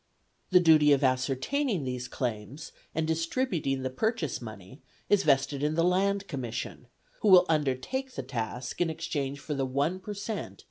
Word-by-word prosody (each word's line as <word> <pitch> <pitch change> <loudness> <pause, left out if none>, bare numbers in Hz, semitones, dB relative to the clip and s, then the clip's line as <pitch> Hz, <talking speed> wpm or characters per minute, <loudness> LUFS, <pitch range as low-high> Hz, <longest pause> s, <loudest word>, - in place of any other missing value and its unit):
The 185 - +6
duty 155 -4 +6
of 140 - +2
ascertaining 135 - 0
these 125 -1 -4
claims 125 +3 -4 0.2
and 160 -1 0
distributing 160 - -1
the 130 - -2
purchase 175 - -1
money 110 - -10 0.3
is 205 -1 +5
vested 135 -3 +2
in 150 +1 0
the 165 - +2
Land 195 +2 +1
Commission, 125 -4 -5 0.3
who 185 -4 +7
undertake 160 - -1
the - - -3
task 125 +1 -4
in 175 - +2
exchange 150 -4 -3
for 150 - -4
the 135 -1 -1
1 145 +8 0
per 205 +2 -7
cent. 200 - -5
150 Hz, 155 wpm, -29 LUFS, 130-180 Hz, 0.3 s, who